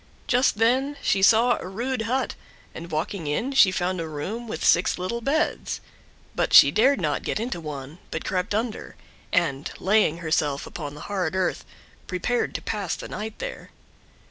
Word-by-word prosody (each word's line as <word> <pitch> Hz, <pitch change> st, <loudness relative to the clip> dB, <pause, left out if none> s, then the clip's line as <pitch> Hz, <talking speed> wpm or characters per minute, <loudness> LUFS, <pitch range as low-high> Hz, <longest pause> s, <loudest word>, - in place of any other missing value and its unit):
Just 250 Hz, -2 st, +2 dB
then 260 Hz, +6 st, +2 dB
she 195 Hz, -, +2 dB
saw 230 Hz, +4 st, +5 dB
a -, -, -7 dB
rude 240 Hz, +6 st, -2 dB
hut, 260 Hz, +2 st, 0 dB, 0.4 s
and 170 Hz, +1 st, -8 dB
walking 160 Hz, +2 st, -3 dB
in 225 Hz, -, -1 dB
she 270 Hz, -8 st, +6 dB
found 185 Hz, -1 st, -1 dB
a 165 Hz, -, -4 dB
room 195 Hz, +11 st, -5 dB
with 160 Hz, -, -4 dB
six 170 Hz, -, +4 dB
little 185 Hz, +6 st, -3 dB
beds, 285 Hz, +6 st, 0 dB, 0.5 s
but -, -, -1 dB
she -, -, +9 dB
dared 265 Hz, +6 st, +4 dB
not -, -, 0 dB
get -, -, -2 dB
into 225 Hz, -6 st, -3 dB
one, 150 Hz, +1 st, -7 dB
but -, -, -5 dB
crept 185 Hz, +2 st, -1 dB
under, 225 Hz, 0 st, -3 dB, 0.4 s
and, 150 Hz, -5 st, 0 dB
laying 195 Hz, -5 st, +2 dB
herself 155 Hz, -4 st, 0 dB
upon 145 Hz, -3 st, -7 dB
the 150 Hz, -, -10 dB
hard 185 Hz, -4 st, -2 dB
earth, 185 Hz, -1 st, 0 dB, 0.4 s
prepared 215 Hz, +7 st, -1 dB
to -, -, -4 dB
pass 200 Hz, -5 st, -2 dB
the -, -, -8 dB
night 215 Hz, +1 st, -5 dB
there. -, -, -6 dB
195 Hz, 170 wpm, -25 LUFS, 165-235 Hz, 0.5 s, she